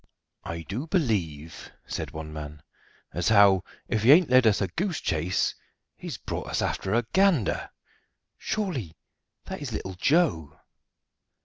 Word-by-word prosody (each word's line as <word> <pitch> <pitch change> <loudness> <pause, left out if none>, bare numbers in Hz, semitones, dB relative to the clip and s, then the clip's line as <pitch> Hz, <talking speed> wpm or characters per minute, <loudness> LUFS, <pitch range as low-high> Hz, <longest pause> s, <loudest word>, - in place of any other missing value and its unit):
"I 85 0 -5
do 115 - -5
believe," 90 - -2
said - - -4
one 75 0 -8
man, 75 0 -8 0.5
"as 90 +5 0
how, 100 -4 +6 0.2
if 110 - 0
he 120 +5 +6
ain't 165 -3 +4
led 130 -2 +6
us 105 - +3
a 100 - 0
goose 175 - -2
chase, 80 +4 0 0.4
he's - - -7
brought - - -5
us - - -2
after 95 +3 -1
a 120 -1 +1
Gander 190 - +2 0.7
surely 165 - -3 0.5
that - - -6
is - - -5
little 95 - -4
Joe." 90 - +1
100 Hz, 140 wpm, -26 LUFS, -, 0.7 s, how